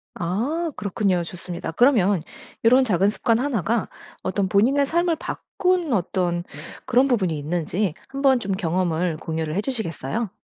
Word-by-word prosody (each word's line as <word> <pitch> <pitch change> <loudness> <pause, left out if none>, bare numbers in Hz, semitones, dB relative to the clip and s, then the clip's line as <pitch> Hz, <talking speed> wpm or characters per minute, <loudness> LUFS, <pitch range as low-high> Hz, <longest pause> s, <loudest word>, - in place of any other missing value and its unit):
아 240 - -1
그렇군요. 195 -3 0
좋습니다. 175 0 -6
그러면 205 - +3 0.4
요런 255 +3 +6
작은 195 -4 +2
습관 225 +2 +1
1 255 -7 0
가 225 +6 0 0.4
어떤 190 +1 0
본인의 255 +9 +3
삶을 340 +3 +1
바꾼 360 -4 -1
어떤 175 -2 0 0.4
그런 255 +1 +4
부분이 190 - +1
있는지 170 +4 -1 0.2
한번 270 -2 +3
좀 200 -4 -2
경험을 175 -2 0
공유를 160 -1 -3
해주시겠어요? 215 - -2
200 Hz, 305 characters per minute, -23 LUFS, 175-255 Hz, 0.4 s, 요런